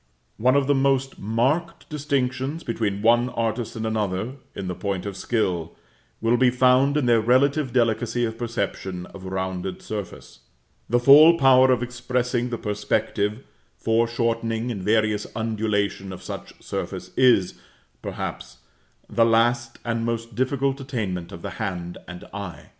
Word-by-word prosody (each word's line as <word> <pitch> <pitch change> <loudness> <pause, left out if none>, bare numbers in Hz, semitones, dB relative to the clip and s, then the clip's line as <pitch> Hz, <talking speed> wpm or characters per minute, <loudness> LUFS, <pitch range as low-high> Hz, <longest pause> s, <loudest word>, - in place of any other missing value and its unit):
One 130 +4 +3
of 140 -1 +3
the 145 - +3
most 135 -1 +1
marked 140 - -1
distinctions 140 0 -2
between 105 -3 -2
one 120 +2 +4
artist 115 -1 -2
and 110 0 -3
another, 110 0 -1 0.2
in 95 - -5
the 90 - -2
point 100 0 -3
of 100 -2 -4
skill, 90 -6 -1 0.5
will 115 +2 +3
be 130 0 +5
found 130 +3 +3
in 145 - +1
their 120 -2 +4
relative 130 +4 +2
delicacy 120 0 +1
of 110 -1 -4
perception 100 -6 -3
of 95 -1 -10
rounded 95 0 -4
surface; 100 - -7 0.5
the 120 +2 +3
full 150 +6 +8
power 130 -3 +6
of 125 -1 +2
expressing 125 0 -1
the 120 - -3
perspective, 105 +2 -1 0.3
foreshortening 115 0 0
and 100 -5 -5
various 110 0 +1
undulation 105 -3 -1
of 95 - -9
such - - -7
surface - - -5
is, 120 -8 +4 0.5
perhaps, - - -6 0.5
the 115 - +2
last 115 +1 +2
and 115 -1 -1
most 115 0 -3
difficult 135 +3 0
attainment 100 -10 -4
of 85 - -10
the - - -4
hand 90 -2 -4
and 90 -1 -9
eye. 90 -7 -7
115 Hz, 145 wpm, -24 LUFS, 105-125 Hz, 0.5 s, full